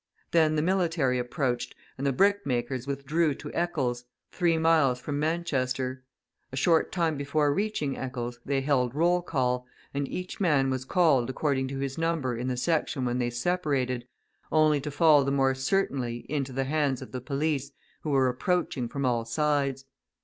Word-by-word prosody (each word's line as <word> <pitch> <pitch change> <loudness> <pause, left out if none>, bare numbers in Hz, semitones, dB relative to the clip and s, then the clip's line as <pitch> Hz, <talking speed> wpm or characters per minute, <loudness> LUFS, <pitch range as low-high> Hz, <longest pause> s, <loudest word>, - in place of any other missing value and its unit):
Then 160 -2 +4
the 150 - +1
military 165 -8 +1
approached, 125 0 -2 0.2
and 140 +2 -2
the - - +3
brickmakers 135 -8 +1
withdrew 140 +3 0
to 150 - -9
Eccles, 135 -8 -1 0.3
three 170 -2 +2
miles 160 -6 +3
from 145 +2 -3
Manchester. 130 -5 -1 0.5
A - - -6
short 160 +5 +3
time 165 -4 0
before 145 +1 +1
reaching 195 -7 -1
Eccles 120 -2 -5
they 135 -1 0
held 135 -3 +1
roll 175 +3 +3
call, 125 -6 -1 0.3
and 140 0 -1
each 180 +5 -6
man 140 -7 +3
was 130 0 -2
called 150 -7 +3
according 130 -1 0
to 135 +1 -5
his 135 +2 -3
number 165 -7 0
in 120 +2 -3
the 125 -1 -1
section 150 -2 0
when 125 0 0
they 120 -1 0
separated, 130 -3 -1 0.4
only 155 -2 +4
to 150 - -4
fall 145 0 +5
the 135 - -1
more 135 -1 +3
certainly 130 -5 -1
into 140 -2 -2
the 135 +1 -1
hands 140 -2 0
of - - -12
the 130 - -5
police, 140 +1 -1 0.3
who 155 - -4
were 135 -2 +3
approaching 130 -1 -1
from 140 +1 -2
all 120 -2 +1
sides. 140 +1 0
140 Hz, 170 wpm, -28 LUFS, 130-160 Hz, 0.5 s, fall